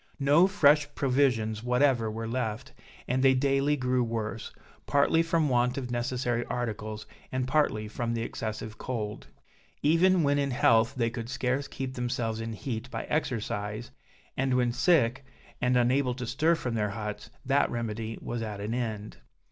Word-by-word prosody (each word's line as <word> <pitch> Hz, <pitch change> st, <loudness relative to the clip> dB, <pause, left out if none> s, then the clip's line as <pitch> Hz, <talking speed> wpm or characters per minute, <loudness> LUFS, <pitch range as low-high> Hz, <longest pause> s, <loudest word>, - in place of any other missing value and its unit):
No 145 Hz, +6 st, +5 dB
fresh 150 Hz, -6 st, +4 dB
provisions 125 Hz, -6 st, +1 dB
whatever 125 Hz, -1 st, +2 dB
were 115 Hz, +1 st, -4 dB
left, 115 Hz, -2 st, -3 dB, 0.3 s
and 130 Hz, +1 st, +1 dB
they 135 Hz, 0 st, +5 dB
daily 135 Hz, +2 st, +2 dB
grew 125 Hz, -1 st, +1 dB
worse, 115 Hz, -1 st, -4 dB, 0.4 s
partly 145 Hz, +3 st, +3 dB
from 165 Hz, -2 st, +1 dB
want 125 Hz, 0 st, +1 dB
of 125 Hz, -3 st, -4 dB
necessary 120 Hz, 0 st, -1 dB
articles, 110 Hz, -3 st, -4 dB, 0.3 s
and 130 Hz, 0 st, -1 dB
partly 130 Hz, -7 st, +1 dB
from 115 Hz, +2 st, -3 dB
the 115 Hz, -, -2 dB
excessive 110 Hz, -1 st, -5 dB
cold. 110 Hz, -4 st, -4 dB, 0.6 s
Even 170 Hz, +3 st, +4 dB
when 145 Hz, 0 st, +2 dB
in 140 Hz, -1 st, 0 dB
health 115 Hz, -3 st, +3 dB
they 115 Hz, -3 st, 0 dB
could 115 Hz, 0 st, -6 dB
scarce 130 Hz, +2 st, -1 dB
keep 135 Hz, -1 st, -5 dB
themselves 120 Hz, -3 st, -2 dB
in 115 Hz, 0 st, -4 dB
heat 115 Hz, +1 st, -5 dB
by -, -, -4 dB
exercise; 110 Hz, -6 st, -3 dB, 0.4 s
and 130 Hz, -1 st, +1 dB
when 125 Hz, -1 st, +2 dB
sick, 130 Hz, -1 st, +2 dB, 0.4 s
and 125 Hz, 0 st, +3 dB
unable 125 Hz, +1 st, +2 dB
to 125 Hz, -1 st, -5 dB
stir 150 Hz, +8 st, +2 dB
from 125 Hz, -7 st, -4 dB
their 105 Hz, -2 st, 0 dB
huts, 105 Hz, +1 st, -5 dB, 0.2 s
that 140 Hz, +2 st, +3 dB
remedy 115 Hz, -1 st, -4 dB
was 120 Hz, -1 st, -3 dB
at 105 Hz, -2 st, -5 dB
an 105 Hz, +3 st, -3 dB
end. 110 Hz, -4 st, -4 dB
125 Hz, 160 wpm, -28 LUFS, 115-135 Hz, 0.6 s, No